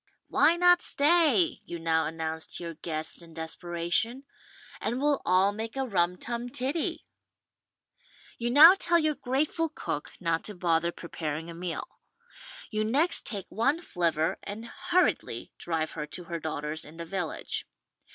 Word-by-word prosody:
"Why 335 - +4
not 355 0 +5
stay," 330 +3 +3
you 170 - -6
now 165 -1 +1
announce 160 0 -4
to - - -7
your 170 -1 -5
guests 155 +1 -2
in 165 -1 -14
desperation, 175 +9 -1 0.6
"and 245 - -2
we'll 290 0 +2
all 185 +3 +4
make 220 +3 -6
a 270 - 0
rum 180 -5 +1
tum 240 +3 -4
tiddy 270 +7 -2 0.7
?" - - -28
You 240 0 -1
now 305 +8 +10
tell 345 -3 +2
your 310 -2 +2
grateful 295 +5 0
cook 150 - -5
not 165 -2 0
to 210 - -6
bother 170 -1 +1
preparing 165 -1 -5
a - - -8
meal. 175 - -4 0.8
You 215 -1 0
next 285 +11 +2
take 200 -4 -3
one 275 +8 +1
flivver 170 - 0
and 220 +3 -7 0.2
hurriedly 365 +1 +1
drive 160 -2 -2
her 150 - -5
to 180 - -7
her 170 0 -5
daughter's 155 0 -4
in 155 +2 -13
the 170 - -5
village. 175 -1 -4
185 Hz, 155 wpm, -28 LUFS, 165-275 Hz, 0.8 s, now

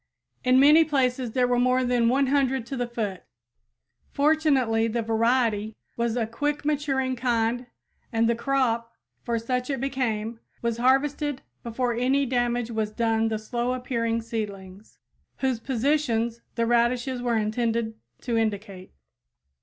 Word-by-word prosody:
In 255 +1 +5
many 300 +4 +7
places 255 -5 0
there 255 -1 +3
were 245 0 +2
more 255 +1 +3
than 245 -2 +2
100 265 -1 +2
to 270 - -5
the 245 -1 -2
foot! 215 -6 -4 0.9
Fortunately 280 -7 +2
the 230 +1 -1
variety 225 -1 +1 0.2
was 235 -1 -1
a 230 - +1
quick 290 +6 -2
maturing 275 -3 0
kind 240 0 0 0.4
and 230 0 +2
the 235 - +3
crop, 235 -2 0 0.3
for 235 -1 -1
such 250 +3 -2
it 270 -3 -1
became, 235 -4 -2 0.2
was 235 -1 0
harvested 270 +2 +1 0.2
before 240 +1 -1
any 260 +4 +1
damage 240 -2 0
was 220 -2 -1
done 225 0 +1
the 220 -1 -1
slow 240 +3 -2
appearing 230 -2 -1
seedlings, 205 -3 -6 0.4
whose 260 -3 0
positions 235 -3 0
the 230 0 +1
radishes 240 +2 +1
were 240 -2 +1
intended 225 +1 -1 0.3
to 240 -2 -2
indicate. 205 -4 -3
240 Hz, 140 wpm, -25 LUFS, 225-260 Hz, 0.9 s, many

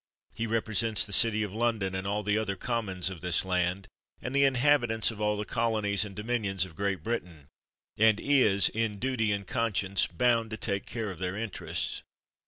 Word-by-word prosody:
He 115 - -3
represents 110 -1 +1
the 100 - -4
city 110 +1 +5
of 100 -2 -5
London, 110 -4 0
and 95 +1 -3
all 105 +1 -1
the 105 +1 +1
other 110 -3 -1
commons 95 -4 -2
of 90 -4 -9
this 90 0 0
land, 90 +1 -1 0.3
and 125 +3 -5
the 140 0 +5
inhabitants 125 -4 +2
of 105 -1 -9
all 105 0 +1
the 105 - -3
colonies 110 -4 0
and 100 -2 -8
do 105 - -5
minions 105 -6 -1
of 90 -3 -13
Great 100 +1 -2
Britain; 90 -11 -4 0.5
and 110 -1 +5
is, 110 -9 +4
in 110 -2 -2
duty 120 -2 0
and 100 -1 -2
conscience, 100 -3 0
bound 115 +4 +1
to 110 - -5
take 100 -3 -3
care 110 -3 -4
of 90 - -10
their 90 +1 -3
interests. 110 -2 -4
105 Hz, 190 wpm, -29 LUFS, 95-115 Hz, 0.5 s, city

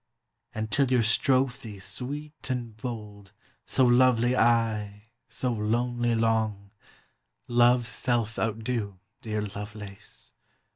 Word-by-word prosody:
And 110 0 -3
till 135 +2 +3
your 125 -2 +4
strophe 125 -1 +1
sweet 140 +11 -6
and 120 -4 -3
bold 105 -4 -7 0.3
So 130 - +3
lovely 125 0 +4
aye, 110 -3 +1 0.2
so 125 -2 -1
lonely 120 +2 0
long, 110 -3 0 0.8
Love's 120 0 +4
self 115 -1 -1
outdo, 110 -2 -2 0.2
dear 105 -1 -2
Lovelace! 105 0 -9
115 Hz, 100 wpm, -27 LUFS, 105-125 Hz, 0.8 s, your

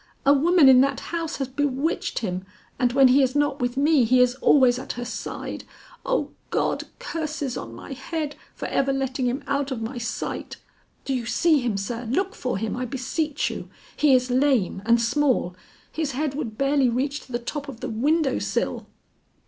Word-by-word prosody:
A 280 - +7
woman 320 +1 +5
in 260 -1 +8
that 275 0 +1
house 330 -1 -2
has 270 - -2
bewitched 285 +3 -1
him, 185 -1 -3 0.4
and 245 -2 +2
when 265 0 +6
he 270 +3 +5
is 260 0 +1
not 290 -1 +1
with 245 +1 -1
me, 290 -1 +4
he 250 +3 +4
is 250 0 +4
always 255 -3 +5
at - - -5
her 245 - -5
side. - - -5 0.4
O - - -1 0.2
God, - - 0
curses 310 - -4
on - - -7
my 275 - -8
head 295 +2 -4 0.2
for - - -5
ever 275 0 +1
letting 265 -1 -1
him 260 +4 -2
out 280 0 -1
of 260 -4 -3
my 240 +2 -4
sight! 225 -1 -4 0.5
Do 270 - -1
you 245 -3 -2
see 310 +7 +3
him, 240 -6 -1
sir? 230 +4 -4
Look 380 +10 0
for 250 -6 -3
him, 215 +2 -2
I 250 +1 -3
beseech 280 +4 -2
you; - - -7 0.3
he 290 -3 +5
is 250 0 +1
lame 255 -8 +2
and 235 0 +5
small; 235 -6 +1 0.4
his 310 -4 -2
head 290 +1 -1
would 240 -7 -5
barely 275 -2 +3
reach 275 +5 -1
to - - -15
the 240 - 0
top 285 +5 -5
of 245 -4 -9
the - - -3
window 275 +4 +1
sill." - - -2
270 Hz, 195 wpm, -24 LUFS, 245-290 Hz, 0.5 s, in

